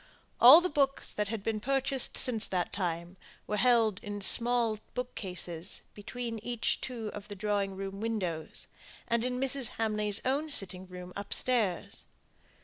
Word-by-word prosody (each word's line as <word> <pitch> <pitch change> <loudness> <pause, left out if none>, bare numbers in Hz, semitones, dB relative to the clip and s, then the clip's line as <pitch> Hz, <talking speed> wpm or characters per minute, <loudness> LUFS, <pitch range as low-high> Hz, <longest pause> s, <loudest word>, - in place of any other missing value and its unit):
All 335 - +10
the 365 - 0
books 275 -3 0
that 210 0 -1
had 215 -1 -4
been 220 0 -1
purchased 270 +2 0
since 230 -5 +3
that 180 -2 -2
time 175 -1 -3 0.3
were 210 - -2
held 225 -4 +3
in 205 -2 -5
small 230 +1 +4 0.2
book 250 0 -4
cases 180 -2 -4
between 230 +2 -6
each 235 +1 -1
two 230 -4 -4
of 205 0 -9
the 205 - -7
drawing 200 -1 -1
room 195 +1 -6
windows, 185 -8 -3 0.4
and 235 0 +1
in 250 0 -2
Mrs. 270 -2 +1
Hamley's 210 -2 +1
own 285 +4 0
sitting 190 -8 +1
room 180 0 -9
upstairs. 205 -1 -1
215 Hz, 150 wpm, -30 LUFS, 195-245 Hz, 0.4 s, All